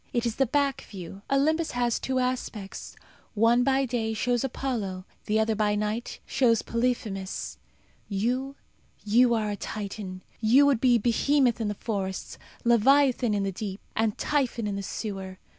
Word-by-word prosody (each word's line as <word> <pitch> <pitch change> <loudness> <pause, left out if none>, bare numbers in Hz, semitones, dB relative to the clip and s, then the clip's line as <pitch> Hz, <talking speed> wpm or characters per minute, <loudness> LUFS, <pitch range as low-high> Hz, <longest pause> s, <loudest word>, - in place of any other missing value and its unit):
It 240 -1 0
is 230 -2 -2
the 270 - +3
back 280 +1 +1
view. 195 0 -9
Olympus 310 +4 +2
has 240 -1 +1
two 260 0 -2
aspects. 250 -6 -3 0.4
One, 230 +3 +4
by 270 +1 +2
day, 225 -3 -2
shows 245 +3 0
Apollo; 225 -8 -3 0.2
the 215 +1 +2
other, 220 0 +2
by 210 -1 +1
night, 210 +3 -2
shows 230 -4 +2
Polyphemus. 230 -5 -2 0.5
You 250 +7 -1 0.5
you 235 +3 +4
are 215 -2 -1
a - - -2
Titan. 200 -3 -6 0.2
You 240 +6 +5
would 275 -5 +3
be 245 -2 +5
Behemoth 240 +2 +2
in 220 - 0
the 205 - -2
forests, 195 -3 -4 0.2
Leviathan 245 0 +4
in 200 - 0
the 195 - -1
deep, 195 +1 -5 0.2
and 220 -1 +1
Typhon 260 -6 0
in 205 -1 -2
the 200 - -3
sewer. 195 -2 -5
230 Hz, 160 wpm, -27 LUFS, 205-255 Hz, 0.5 s, You